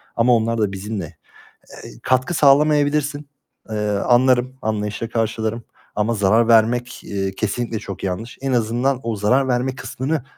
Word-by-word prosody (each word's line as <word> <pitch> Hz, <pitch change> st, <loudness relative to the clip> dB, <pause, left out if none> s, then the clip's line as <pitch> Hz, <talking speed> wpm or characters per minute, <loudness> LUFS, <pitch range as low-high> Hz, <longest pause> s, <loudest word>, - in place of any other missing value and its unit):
ama 120 Hz, +1 st, +4 dB
onlar 115 Hz, 0 st, 0 dB
da 105 Hz, -2 st, +1 dB
bizimle. 100 Hz, -1 st, -5 dB, 0.8 s
Eee, -, -, -9 dB
katkı 130 Hz, +6 st, +1 dB
sağlamayabilirsin. 145 Hz, 0 st, +3 dB, 0.4 s
Eee, 110 Hz, -, -3 dB
anlarım, 125 Hz, +4 st, +2 dB
anlayışla 110 Hz, +1 st, -2 dB
karşılarım 110 Hz, 0 st, -2 dB, 0.3 s
ama 110 Hz, +2 st, +1 dB
zarar 110 Hz, +3 st, +3 dB
vermek, 120 Hz, +2 st, +2 dB
eee, 95 Hz, -1 st, -3 dB
kesinlikle 110 Hz, +3 st, -2 dB
çok 100 Hz, -1 st, -7 dB
yanlış. 95 Hz, +6 st, -4 dB
En 135 Hz, -1 st, -2 dB
azından 120 Hz, +3 st, 0 dB
o 115 Hz, -2 st, -2 dB
zarar 125 Hz, +7 st, +2 dB
verme 125 Hz, +1 st, 0 dB
kısmını, 130 Hz, +2 st, -3 dB
115 Hz, 140 wpm, -20 LUFS, 110-130 Hz, 0.8 s, ama